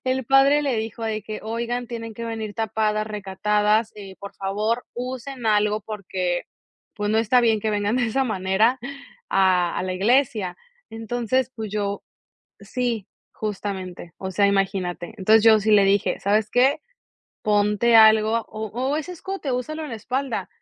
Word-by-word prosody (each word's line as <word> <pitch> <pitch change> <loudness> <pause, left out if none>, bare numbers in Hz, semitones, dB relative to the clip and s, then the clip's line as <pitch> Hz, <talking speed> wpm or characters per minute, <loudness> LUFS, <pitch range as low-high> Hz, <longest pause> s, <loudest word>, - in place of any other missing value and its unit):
el 260 0 0
padre 275 +2 +5
le 275 -4 0
dijo 225 +1 -4
de 215 -1 -2
que: 215 +1 -6
"Oigan, 235 +2 -3
tienen 230 -2 -6
que 235 - -6
venir 220 -2 -4
tapadas, 215 -1 -1
recatadas, 210 +2 0
eh, 195 -2 -10
por 200 - -9
favor, 210 +5 -1
usen 250 0 -5
algo 210 0 +2
porque 185 -4 -3 0.5
pues 210 0 -1
no 220 - +2
está 240 +3 +4
bien 225 -2 +2
que 215 +1 -1
vengan 205 +1 0
de 245 -2 +1
esa 265 +4 0
manera 215 +4 +1 0.5
a 185 -2 +2
a - - -1
la 185 - -2
iglesia", 210 -3 +1 0.3
entonces 240 +3 -1
pues 220 -2 -5
yo 205 -1 -2 0.6
Sí, 230 -1 -3 0.2
justamente, 190 -4 -5
o 190 0 -5
sea, 200 +2 +3
imagínate, 195 -3 -1
entonces 215 +3 +4
yo 220 -1 +7
sí 215 +1 0
le 205 -2 +6
dije: 200 +1 +1
"¿Sabes 210 +1 +1
qué?, 270 +5 +3 0.6
ponte 210 +2 +2
algo, 220 +1 +5
o 220 0 -5
o 260 +5 -1
ese 335 +4 -4
escote, 360 -6 -5
úsalo 310 +6 -3
en 290 - -7
la 225 - -4
espalda", 260 +5 -3
220 Hz, 165 wpm, -23 LUFS, 205-240 Hz, 0.6 s, yo